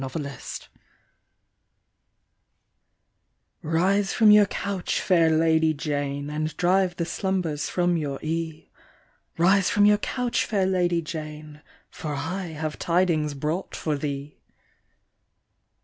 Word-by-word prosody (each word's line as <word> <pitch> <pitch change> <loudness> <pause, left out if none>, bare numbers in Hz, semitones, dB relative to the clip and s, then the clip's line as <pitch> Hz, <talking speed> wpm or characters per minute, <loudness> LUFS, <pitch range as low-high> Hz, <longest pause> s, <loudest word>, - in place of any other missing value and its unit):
XVlSE 190 +5 +1
from 220 -2 +5
your 210 -1 +7
couch, 200 -2 -2
fair 170 -4 +3
Lady 160 0 +3
Jane, 145 -1 -3
And 155 +1 -3
drive 180 0 +2
the 170 - -2
slumbers 180 -5 -2
from 175 -1 +1
your 145 -3 -3
ee', 160 0 -4 0.7
Rise 190 +3 +4
from 205 0 +4
your 210 0 +5
couch, 245 0 -1
fair 200 -3 0
Lady 175 -2 +1
Jane, 155 -1 -7 0.3
For 150 -3 -5
I 175 +7 -3
have 155 -1 -5
tidings 165 -4 +1
brought 155 +7 -3
for 155 -2 -2
thee.'' 140 0 -5
165 Hz, 105 wpm, -25 LUFS, 150-185 Hz, 0.7 s, your